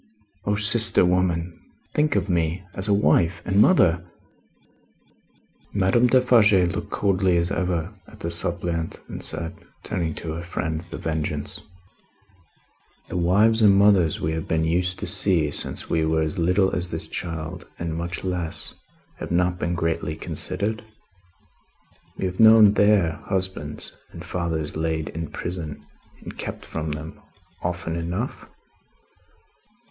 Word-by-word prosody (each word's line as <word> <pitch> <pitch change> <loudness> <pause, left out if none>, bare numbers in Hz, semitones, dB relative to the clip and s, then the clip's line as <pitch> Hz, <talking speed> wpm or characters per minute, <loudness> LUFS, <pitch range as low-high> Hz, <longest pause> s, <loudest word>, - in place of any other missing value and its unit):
O 105 - +1
sister 105 -1 +7
woman, 90 -2 0 0.4
think 150 -1 +1
of - - 0
me. 85 0 -1
As 95 +2 -4
a - - +1
wife 85 -3 +3
and 100 +2 +3
mother!" 90 - +4 1.7
Madame 100 +5 +3
Defarge 120 -4 +5
looked, 90 -1 +1
coldly 95 -3 +1
as 85 +2 0
ever, 90 -1 -2
at - - -16
the 85 - -3
suppliant, 85 -1 -3
and - - -7
said, 80 0 -3 0.3
turning 85 -4 -3
to 80 - -6
her 85 - -5
friend 80 -2 -4
The - - -7
Vengeance: 75 -2 -3 1.5
"The - - -3
wives 105 +6 +3
and 100 -2 +6
mothers 100 -5 +4
we 80 - -1
have 80 0 -4
been 80 0 0
used 90 +2 0
to - - -4
see, 90 -5 +4
since - - -4
we 80 - 0
were 80 0 +1
as 80 +2 -3
little 90 +3 +2
as 90 -1 -2
this - - -4
child, 85 0 -6
and 85 -1 -4
much 85 +1 -4
less, 90 -3 -3 0.5
have - - -6
not 90 +1 +1
been 85 - -1
greatly 80 -2 -2
considered? 105 +6 -3 1.3
We - - -2
have 90 0 -4
known 110 -2 +8
their 100 -6 +2
husbands 95 -6 -3
and - - -10
fathers 80 -4 -3
laid 80 -1 -2
in 80 0 -5
prison 85 -2 -6 0.4
and - - -9
kept - - -6
from 80 -1 -4
them, 80 +2 -9 0.4
often 85 -1 -3
enough? 85 +9 -4
90 Hz, 140 wpm, -23 LUFS, 80-95 Hz, 1.7 s, known